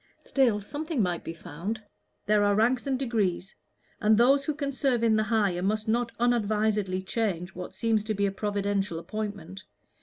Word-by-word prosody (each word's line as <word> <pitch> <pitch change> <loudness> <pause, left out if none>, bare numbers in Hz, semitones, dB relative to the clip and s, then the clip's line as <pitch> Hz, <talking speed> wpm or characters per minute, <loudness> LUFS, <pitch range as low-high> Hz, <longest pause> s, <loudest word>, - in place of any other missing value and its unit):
Still, 245 -6 +2
something 300 +7 -4
might 175 -2 -1
be - - -5
found. 190 +9 -5 0.4
There 210 0 +3
are 205 0 +3
ranks 240 +5 +2
and 265 -1 +1
degrees 210 -8 -1 0.5
and 215 0 +4
those 275 +4 +4
who 305 - -1
can 285 -2 -2
serve 260 -3 0
in 225 -1 +4
the 215 - +3
higher 210 -5 +1
must 215 +3 0
not 230 +1 +1
unadvisedly 215 -5 +1
change 190 -4 -2
what 180 0 -8
seems 225 -2 +1
to 215 -1 -1
be 200 0 +1
a 195 - +1
providential 200 -2 -1
appointment. 200 -1 -5
215 Hz, 175 wpm, -27 LUFS, 195-235 Hz, 0.5 s, and